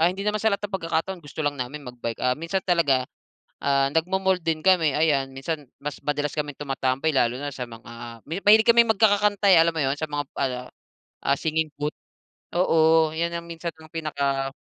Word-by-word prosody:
ah, 165 Hz, -, +5 dB
hindi 190 Hz, +2 st, -5 dB
naman 210 Hz, 0 st, 0 dB
sa 220 Hz, -, +4 dB
lahat 200 Hz, +1 st, -2 dB
ng 200 Hz, -, -10 dB
pagkakataon 165 Hz, +3 st, -2 dB
gusto 145 Hz, +2 st, -8 dB
lang 145 Hz, 0 st, 0 dB
namin 140 Hz, +4 st, -5 dB
mag-bike. 120 Hz, -2 st, -6 dB
Ah, 125 Hz, 0 st, +2 dB
minsan 165 Hz, +5 st, -2 dB
talaga, 145 Hz, -8 st, +2 dB, 0.6 s
ah, 140 Hz, -1 st, +2 dB
nagma-mall 190 Hz, +3 st, +1 dB
din 160 Hz, -1 st, -1 dB
kami, 170 Hz, -6 st, +4 dB
ayan. 145 Hz, -4 st, +2 dB
Minsan 145 Hz, +2 st, -4 dB, 0.2 s
mas 150 Hz, 0 st, -4 dB
madalas 145 Hz, 0 st, -1 dB
kaming 145 Hz, -2 st, -3 dB
tumatambay 135 Hz, 0 st, -1 dB
lalo 125 Hz, -1 st, +2 dB
na 145 Hz, -, -3 dB
sa 125 Hz, -, -4 dB
mga 115 Hz, 0 st, -10 dB
mi 165 Hz, -, -3 dB
mahilig 220 Hz, +2 st, +6 dB
kaming 235 Hz, -1 st, +6 dB
magkakakanta. 205 Hz, -1 st, +3 dB
eh. -, -, +8 dB
Alam 165 Hz, 0 st, +3 dB
mo -, -, 0 dB
yun 135 Hz, +1 st, 0 dB
sa 155 Hz, -, -3 dB
mga 145 Hz, 0 st, -2 dB
ano, 130 Hz, -2 st, -1 dB, 0.7 s
ah, 140 Hz, -, +3 dB
singing 160 Hz, -1 st, -1 dB
booth. 150 Hz, +1 st, -2 dB, 0.6 s
Oo, 160 Hz, -2 st, +4 dB
'yan 170 Hz, +1 st, -1 dB
ang 170 Hz, 0 st, -6 dB
minsan 170 Hz, 0 st, -5 dB
ang 160 Hz, 0 st, -14 dB
pinaka 140 Hz, -4 st, -1 dB
155 Hz, 195 wpm, -24 LUFS, 135-175 Hz, 0.7 s, eh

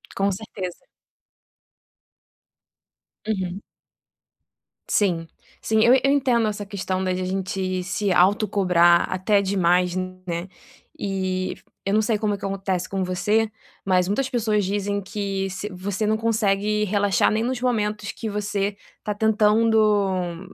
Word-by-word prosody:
Com 195 Hz, 0 st, +1 dB
certeza. 190 Hz, -3 st, -7 dB, 2.4 s
Uhum. 190 Hz, -2 st, -3 dB, 1.3 s
Sim. 170 Hz, -5 st, +1 dB, 0.3 s
Sim. 220 Hz, 0 st, +2 dB
Eu 240 Hz, -, +6 dB
eu 275 Hz, -, +3 dB
entendo 245 Hz, -5 st, +2 dB
essa 205 Hz, -1 st, -3 dB
questão 190 Hz, -2 st, -3 dB
da 185 Hz, -, 0 dB
de 185 Hz, -, -3 dB
a -, -, -2 dB
gente 185 Hz, -1 st, -2 dB
se 195 Hz, +2 st, -1 dB
autocobrar 180 Hz, -3 st, +4 dB
até 200 Hz, +2 st, +2 dB
demais, 180 Hz, -2 st, +2 dB
né. 185 Hz, -1 st, -4 dB, 0.5 s
E 185 Hz, -2 st, -2 dB, 0.3 s
eu 195 Hz, -, 0 dB
não 215 Hz, -, +4 dB
sei 215 Hz, 0 st, +1 dB
como 210 Hz, -1 st, 0 dB
é -, -, -3 dB
que 195 Hz, -, -7 dB
acontece 190 Hz, -2 st, -2 dB
com 195 Hz, -1 st, -1 dB
você, 210 Hz, +5 st, +1 dB, 0.4 s
mas 185 Hz, -1 st, +2 dB
muitas 265 Hz, +6 st, 0 dB
pessoas 215 Hz, -5 st, +1 dB
dizem 200 Hz, +1 st, -1 dB
que 195 Hz, -1 st, -3 dB
se 200 Hz, +3 st, -5 dB
você 200 Hz, +3 st, -3 dB
não 220 Hz, 0 st, +2 dB
consegue 210 Hz, -2 st, +1 dB
relaxar 205 Hz, 0 st, +2 dB
nem 220 Hz, +1 st, 0 dB
nos 250 Hz, 0 st, -2 dB
momentos 210 Hz, -4 st, -1 dB
que 225 Hz, -, -6 dB
você 205 Hz, -1 st, -2 dB, 0.3 s
tá 210 Hz, -, -2 dB
tentando, 210 Hz, -4 st, +2 dB
200 Hz, 135 wpm, -23 LUFS, 185-215 Hz, 2.4 s, Eu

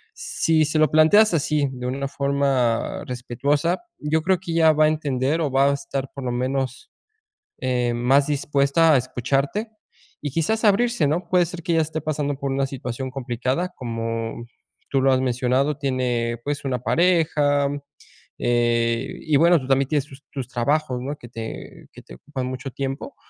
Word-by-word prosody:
Si 160 Hz, -1 st, +1 dB
se 155 Hz, +1 st, 0 dB
lo 155 Hz, -3 st, +4 dB
planteas 175 Hz, +7 st, +5 dB
así, 150 Hz, -2 st, +1 dB
de 125 Hz, -1 st, -7 dB
una 135 Hz, +2 st, -2 dB
forma 140 Hz, -5 st, 0 dB
respetuosa, 140 Hz, +7 st, -1 dB, 0.2 s
yo 155 Hz, +2 st, 0 dB
creo 185 Hz, +2 st, +3 dB
que 175 Hz, -2 st, -6 dB
ella 165 Hz, -1 st, +5 dB
va 155 Hz, 0 st, +4 dB
a -, -, +5 dB
entender, 145 Hz, -1 st, 0 dB
o 150 Hz, -, 0 dB
va 135 Hz, +1 st, +4 dB
a -, -, +1 dB
estar 135 Hz, -1 st, -4 dB
por 135 Hz, -2 st, -7 dB
lo 125 Hz, -, -1 dB
menos, 130 Hz, +1 st, -2 dB, 0.7 s
eh, 125 Hz, -2 st, 0 dB
más 135 Hz, +4 st, +3 dB
dispuesta 145 Hz, +2 st, +3 dB
a -, -, +5 dB
escucharte 135 Hz, -, -1 dB, 0.5 s
y 145 Hz, -, -3 dB
quizás 165 Hz, +10 st, 0 dB
abrirse, 215 Hz, -3 st, +3 dB
¿no? 165 Hz, +5 st, -1 dB
Puede 180 Hz, -1 st, +3 dB
ser 170 Hz, +1 st, -8 dB
que 170 Hz, -, 0 dB
ella 165 Hz, -1 st, +3 dB
esté 155 Hz, 0 st, -3 dB
pasando 145 Hz, -2 st, -2 dB
por 140 Hz, -1 st, -2 dB
una 135 Hz, 0 st, 0 dB
situación 130 Hz, -1 st, -5 dB
complicada, 130 Hz, +6 st, -2 dB
como 115 Hz, -1 st, -4 dB, 0.4 s
tú 135 Hz, -, +2 dB
lo 135 Hz, 0 st, +4 dB
has 130 Hz, -, +3 dB
mencionado. 130 Hz, +3 st, 0 dB
Tiene 125 Hz, -4 st, -1 dB
pues 145 Hz, 0 st, -3 dB
una 130 Hz, -2 st, -1 dB
pareja, 150 Hz, -2 st, +2 dB, 0.7 s
eh, 120 Hz, 0 st, +1 dB
y 155 Hz, -, 0 dB
bueno, 170 Hz, +3 st, +5 dB
tú 130 Hz, -, -8 dB
también 135 Hz, 0 st, +2 dB
tienes 145 Hz, -3 st, +1 dB
tus 140 Hz, -1 st, -14 dB
tus 135 Hz, -4 st, -5 dB
trabajos, 130 Hz, +2 st, 0 dB
no 140 Hz, +3 st, -4 dB
que 120 Hz, -, -12 dB
te 115 Hz, -1 st, -8 dB
que -, -, -12 dB
te -, -, -12 dB
ocupan 135 Hz, -3 st, -5 dB
mucho 130 Hz, +1 st, -5 dB
tiempo, 135 Hz, -, -5 dB
140 Hz, 175 wpm, -23 LUFS, 125-155 Hz, 0.7 s, planteas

